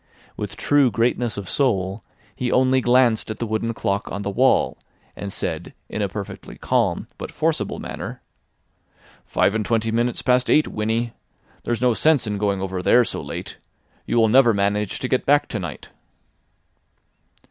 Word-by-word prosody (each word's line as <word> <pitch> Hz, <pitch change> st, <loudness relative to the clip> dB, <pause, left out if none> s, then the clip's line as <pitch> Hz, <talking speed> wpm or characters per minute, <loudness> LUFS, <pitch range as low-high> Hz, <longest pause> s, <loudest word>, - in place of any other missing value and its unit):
With -, -, -5 dB
true 145 Hz, -3 st, +3 dB
greatness 115 Hz, +1 st, 0 dB
of 100 Hz, -2 st, -5 dB
soul, 100 Hz, -7 st, 0 dB, 0.3 s
he 125 Hz, -1 st, -2 dB
only 130 Hz, 0 st, +3 dB
glanced 120 Hz, -3 st, +3 dB
at 110 Hz, -, -4 dB
the 120 Hz, -, -3 dB
wooden 110 Hz, +1 st, -1 dB
clock 100 Hz, 0 st, -2 dB
on 100 Hz, +1 st, -4 dB
the 100 Hz, -, -2 dB
wall, 130 Hz, +6 st, +2 dB, 0.4 s
and 100 Hz, -, -6 dB
said -, -, -4 dB
in 105 Hz, -, -3 dB
a 100 Hz, -, 0 dB
perfectly 100 Hz, +1 st, -7 dB
calm -, -, 0 dB
but -, -, -5 dB
forcible -, -, -1 dB
manner: -, -, -6 dB, 1.1 s
"Five 100 Hz, -, +2 dB
and 110 Hz, -1 st, 0 dB
twenty 115 Hz, +1 st, 0 dB
minutes 120 Hz, +2 st, 0 dB
past 125 Hz, 0 st, +2 dB
eight, 155 Hz, -, +4 dB
Winnie. 110 Hz, +2 st, -1 dB, 0.5 s
There's 120 Hz, 0 st, -1 dB
no 125 Hz, -1 st, +4 dB
sense 150 Hz, +1 st, +3 dB
in 105 Hz, -1 st, -3 dB
going 100 Hz, -2 st, 0 dB
over 95 Hz, -1 st, -3 dB
there 120 Hz, +6 st, +5 dB
so -, -, -3 dB
late. -, -, -7 dB, 0.5 s
You -, -, 0 dB
will 115 Hz, -1 st, +5 dB
never 120 Hz, -1 st, +5 dB
manage 100 Hz, 0 st, 0 dB
to 130 Hz, -, -1 dB
get 130 Hz, -, +1 dB
back 145 Hz, +1 st, +4 dB
to 110 Hz, -, -3 dB
night." 85 Hz, -7 st, -7 dB
115 Hz, 170 wpm, -22 LUFS, 100-125 Hz, 1.1 s, there